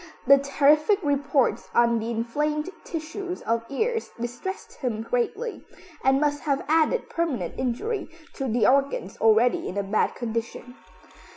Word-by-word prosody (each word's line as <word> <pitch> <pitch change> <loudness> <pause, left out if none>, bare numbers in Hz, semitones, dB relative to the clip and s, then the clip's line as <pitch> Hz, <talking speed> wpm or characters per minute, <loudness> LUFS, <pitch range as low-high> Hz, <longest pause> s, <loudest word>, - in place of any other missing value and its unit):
The 275 +1 +7
terrific 300 +7 +3
reports 285 -2 +1
on 235 -1 +4
the 225 +1 -4
inflamed 295 +8 -1
tissues 355 +3 -5
of 230 0 -1
his 275 - -7
ears 455 0 0
distressed 245 - -5
him 225 -4 -2
greatly, 245 - -2 0.4
and 265 +1 +4
must 290 0 0
have 280 -3 -1
added 325 +10 +2
permanent 275 - -2
injury 370 - -2 0.2
to 270 - -3
the 235 0 +2
organs 275 -7 +1
already 225 +2 +3
in 190 - -5
a 200 - 0
bad 200 +2 0
condition. 230 +1 -5
275 Hz, 145 wpm, -25 LUFS, 235-310 Hz, 0.4 s, The